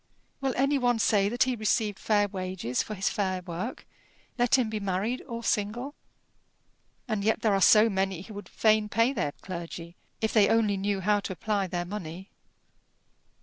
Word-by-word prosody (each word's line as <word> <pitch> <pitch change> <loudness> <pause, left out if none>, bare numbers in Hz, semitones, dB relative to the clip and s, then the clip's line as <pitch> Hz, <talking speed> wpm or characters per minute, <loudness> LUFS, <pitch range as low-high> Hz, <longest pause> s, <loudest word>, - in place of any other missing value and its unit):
Will 270 -2 -1
any 275 +2 +2
one 245 -2 +2
say 205 -2 +2
that 240 +3 +2
he 255 -1 -1
received 215 -2 0
fair 205 -1 +2
wages 185 - -3
for 215 - -6
his 195 0 -1
fair 190 -3 -1
work, 180 +8 -5 0.5
let 245 0 +3
him 250 -3 +1
be 215 -1 -3
married 200 +5 -2
or 235 -2 -6
single? 230 +7 -1 1.1
And 215 -4 -1
yet 220 +1 +1
there 215 -3 +3
are 195 - +1
so 215 +3 +7
many 190 -3 -1
who 215 - -11
would 205 0 -9
fain 215 -1 +2
pay 230 +5 +2
their 150 - -2
clergy, 170 -1 -7 0.2
if 220 - -1
they 210 -3 +5
only 220 -3 +3
knew 195 0 -1
how 205 +2 +2
to 200 - -5
apply 200 0 -1
their 175 -1 -3
money! 185 -1 -7
205 Hz, 180 wpm, -28 LUFS, 190-225 Hz, 1.1 s, so